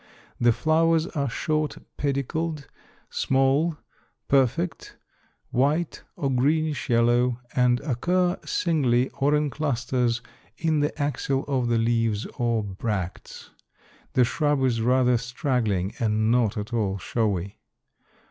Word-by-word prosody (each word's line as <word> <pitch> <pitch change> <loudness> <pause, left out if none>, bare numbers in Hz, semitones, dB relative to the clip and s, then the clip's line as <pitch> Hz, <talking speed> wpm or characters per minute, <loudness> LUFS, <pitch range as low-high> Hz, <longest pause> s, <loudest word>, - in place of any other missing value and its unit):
The 120 0 +5
flowers 160 +4 +2
are 140 -6 -2
short 155 +4 -1 0.2
pedicled, 145 +2 -2 0.4
small, 135 +5 +2 0.5
perfect, 140 +6 0 0.5
white 150 +6 +1
or 140 -2 -1
greenish 150 +4 +1
yellow, 120 +1 +3 0.2
and 125 -1 +3
occur 175 +7 0
singly 130 -7 +1
or 145 +2 +1
in 150 -1 0
clusters 125 -4 -1 0.3
in 160 -2 +1
the 145 0 +2
axil 140 -1 -1
of 130 -4 0
the 120 -1 +2
leaves 115 -2 +1
or 115 -2 +1
bracts. 95 -2 -5 0.6
The 125 - +4
shrub 145 +1 0
is 120 -3 +1
rather 125 0 +3
straggling 120 -6 -1
and 110 -1 +1
not 120 -4 +2
at 105 +3 -5
all 100 -4 0
showy. 100 -2 -2
125 Hz, 115 wpm, -25 LUFS, 115-150 Hz, 0.6 s, The